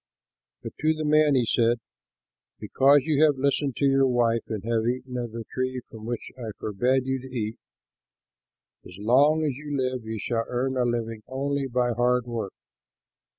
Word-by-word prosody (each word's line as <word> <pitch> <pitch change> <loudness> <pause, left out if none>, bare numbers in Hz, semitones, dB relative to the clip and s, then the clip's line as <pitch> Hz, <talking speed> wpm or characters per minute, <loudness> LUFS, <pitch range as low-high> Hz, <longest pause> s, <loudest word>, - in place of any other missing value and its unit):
But - - -6
to 155 +1 +2
the 155 0 -3
man 150 -1 +4
he 125 -2 +3
said, 115 +1 +2 0.8
"Because 140 +2 +4
you 155 0 +2
have 150 -3 +4
listened 140 -1 0
to 140 - 0
your 135 -1 +4
wife 120 -2 +2
and 105 -3 -4
have 115 0 0
eaten 125 +1 -3
of 120 -2 -3
the 115 0 -6
tree 130 0 -2
from 110 -1 -10
which 120 -1 -4
I 115 -3 -5
forbade 125 +6 0
you 130 0 -1
to 130 - -9
eat, 110 -3 -4 1.2
as 90 - -12
long 140 +9 +4
as 150 - +1
you 145 -1 -4
live 130 -2 -1
you 110 0 -4
shall 115 +2 -2
earn 130 +2 -1
a 125 -1 +1
living 115 -2 -2
only 140 +1 -2
by 120 -1 0
hard 125 +1 +1
work. 115 -5 -4
125 Hz, 180 wpm, -26 LUFS, 115-135 Hz, 1.2 s, man